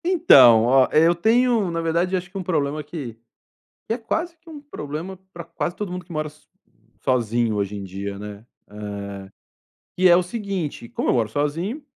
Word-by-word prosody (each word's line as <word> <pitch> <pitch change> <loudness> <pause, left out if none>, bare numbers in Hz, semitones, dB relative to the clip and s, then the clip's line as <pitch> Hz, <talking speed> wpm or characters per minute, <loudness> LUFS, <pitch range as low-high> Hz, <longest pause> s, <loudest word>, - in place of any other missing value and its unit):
Então, 135 - +7
ó, 130 +2 +5
eu 165 +3 +5
tenho, 225 +2 +2
na 165 0 -2
verdade, 170 +3 0
acho 180 0 -4
que 195 - -8
um 190 - -4
problema 150 -4 -1
que 145 -6 -7 0.7
que 225 - -1
é - - -5
quase 330 +9 -3
que 335 +1 -21
um 305 -3 -9
problema 180 - -7
para 170 - -7
quase 170 +1 -4
todo 205 -1 -5
mundo 180 0 -6
que 175 - -12
mora 155 -1 -2
so 150 0 -21 0.5
sozinho 120 -2 +1
hoje 100 0 -2
em 100 - -6
dia, 100 +1 -6
né. 105 +1 -9 0.2
Eh, 100 -2 -7 0.7
que 185 0 +5
é 175 - +7
o 180 - +3
seguinte, 185 - -5
como - - -3
eu - - +3
moro 115 -3 +1
sozinho, 160 - -2
160 Hz, 190 wpm, -22 LUFS, 115-190 Hz, 0.7 s, Então